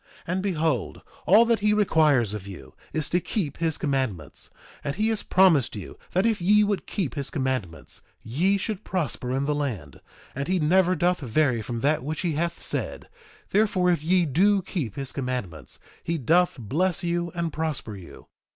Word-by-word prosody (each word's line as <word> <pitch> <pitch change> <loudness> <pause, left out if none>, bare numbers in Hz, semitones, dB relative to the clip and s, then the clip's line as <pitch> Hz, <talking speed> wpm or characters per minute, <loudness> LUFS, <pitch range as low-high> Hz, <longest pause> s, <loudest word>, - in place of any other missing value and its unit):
2:22 175 - -2
And 185 - 0
behold, 160 - -1 0.3
all 215 +6 +7
that 230 -1 +2
he 210 +1 +3
requires 155 - +3
of 100 -2 -6
you 80 -10 -10 0.2
is 155 -2 -1
to 175 - +3
keep 165 -5 -3
his 165 -2 0
commandments; 130 - -2 0.3
and 140 - -2
he 215 +4 +1
has 220 -2 +1
promised 165 -11 +4
you 100 - -7 0.2
that 185 +4 +2
if 220 -4 +1
ye 210 +4 +5
would 205 -1 -1
keep 175 - -2
his 140 -2 -3
commandments 130 - -3 0.2
ye 175 - +1
should 210 +1 -4
prosper 155 -8 -2
in 135 +2 0
the 150 - +1
land; 110 - -4 0.3
and 140 +2 -3
he 185 - +2
never 180 +3 +3
doth 175 +2 +1
vary 130 -2 +1
from 115 +1 -4
that 145 0 +2
which 155 +3 -3
he 175 - 0
hath 170 +3 -2
said; - - -4 0.4
therefore, 190 -3 +3
if 170 -4 0
ye 180 +1 +3
do 190 +7 +3
keep 160 - -4
his 135 -2 -4
commandments 115 - -4 0.3
he 170 0 -1
doth 170 +6 +3
bless 160 - 0
you 170 0 -1
and 170 -3 -2
prosper 155 -9 -2
you. 90 -3 -12
155 Hz, 185 wpm, -25 LUFS, 130-185 Hz, 0.4 s, all